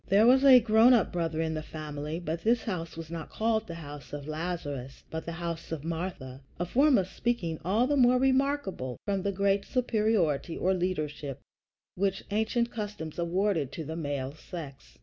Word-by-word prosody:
There 200 +3 +5
was 260 +3 +6
a 265 -2 +9
grown 225 +2 +6
up 220 - +1
brother 165 -2 -1
in 160 0 -1
the 155 - -3
family; 150 0 -5
but 170 -1 -3
this 230 +4 +2
house 165 -5 -4
is 165 -1 -7
not 165 -2 -5
called 220 0 0
the 170 - -6
house 145 -3 -9
of 145 0 -6
Lazarus, 155 -5 -4
but 160 0 -4
the - - -2
house 170 -1 -5
of 155 -3 -4
Martha 160 -6 -5 0.2
a 175 - 0
form 275 - +4
of 185 - +1
speaking 185 -7 -2
the 230 - +2
more 250 -2 +5
remarkable 265 - 0
from 195 -2 0
the 200 +1 0
great 200 +1 +1
superiority 215 - +1
or 190 - +2
leadership 155 -6 -2 0.5
which 195 0 -1
ancient 220 +3 +1
customs 205 -8 -5
awarded 170 -4 0
to 165 - -4
the 160 +2 -5
male 145 -4 -3
sex. 155 -3 -9
175 Hz, 180 wpm, -29 LUFS, 155-220 Hz, 0.5 s, a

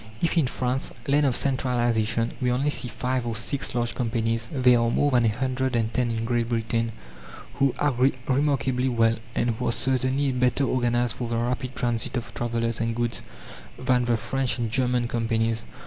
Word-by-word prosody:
If 170 - 0
in 160 -6 +3
France, 125 +1 -1 0.2
land 145 +1 +3
of 125 - +1
centralization, 120 -4 0
we 125 -1 +2
only 135 +4 +1
see 130 - -1
five 125 +1 -2
or 115 - -2
six 120 +4 -2
large 120 -1 0
companies, 115 -1 -1
there 125 -3 +4
are 115 0 +2
more 145 +4 +2
than 120 -2 +3
a - - +4
hundred 130 +2 -1
and 115 -1 0
ten 125 0 +1
in 115 0 -2
Great 120 -1 0
Britain 115 0 0 0.7
who 135 -2 +3
agree 135 -2 +2
remarkably 130 -2 +1
well, 115 -1 +2 0.2
and 120 - +1
who 110 - -3
are - - +2
certainly 130 +2 +1
better 125 +2 +1
organized 120 -3 +1
for 120 -2 -3
the 115 - -1
rapid 125 +2 -2
transit 120 +1 -1
of 120 - -5
travellers 115 -1 -1
and 115 0 -1
goods 120 0 -1 0.6
than 125 -1 +1
the 120 -1 +2
French 135 +2 -1
and 115 -3 -2
German 125 -1 +1
companies. 115 -1 0
120 Hz, 185 wpm, -25 LUFS, 115-130 Hz, 0.7 s, there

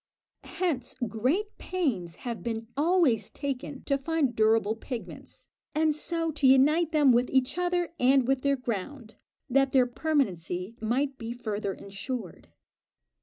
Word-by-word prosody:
Hence 310 -10 -1
great 265 - -1
pains 235 - -2
have 235 -2 -4
been 225 -1 -3
always 290 - +2
taken 275 -1 -5
to 275 -1 0
find 280 -4 0
durable 220 0 +3
pigments, 235 +1 -8 0.3
and 310 0 +3
so 330 +2 -2
to 290 -3 +2
unite 300 +5 +5
them 295 -4 +5
with 245 +1 +3
each 265 +1 +2
other 355 -1 0
and 260 0 +4
with 270 -1 +1
their 280 0 +2
ground, 235 0 -5 0.3
that 270 +1 +2
their 260 -2 +5
permanency 225 - -1
might 265 +5 -1
be 230 0 -4
further 215 -4 -3
insured. 200 0 -6
260 Hz, 135 wpm, -28 LUFS, 225-295 Hz, 0.3 s, unite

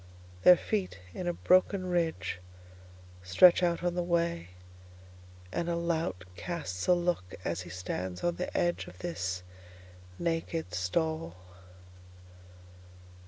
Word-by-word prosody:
Their 180 -1 +9
feet, 195 - -2 0.2
in 180 - -4
a 175 - +1
broken 185 +2 +3
ridgeStretch 90 - +1
out 175 -1 +1
on 175 -1 +1
the 175 - 0
way, 170 - 0 1.0
and 170 - -1
a 170 - +1
lout 165 - -1
castsA 165 - 0
look 175 - -1
as 85 +1 -1
he 90 - -9
stands 90 0 -4
on 175 0 +1
the 180 - -3
edge 175 0 0
of 90 - -12
this 90 +1 -3 0.7
naked 165 - -2
stall. 160 - -1
160 Hz, 115 wpm, -30 LUFS, -, 1.0 s, Their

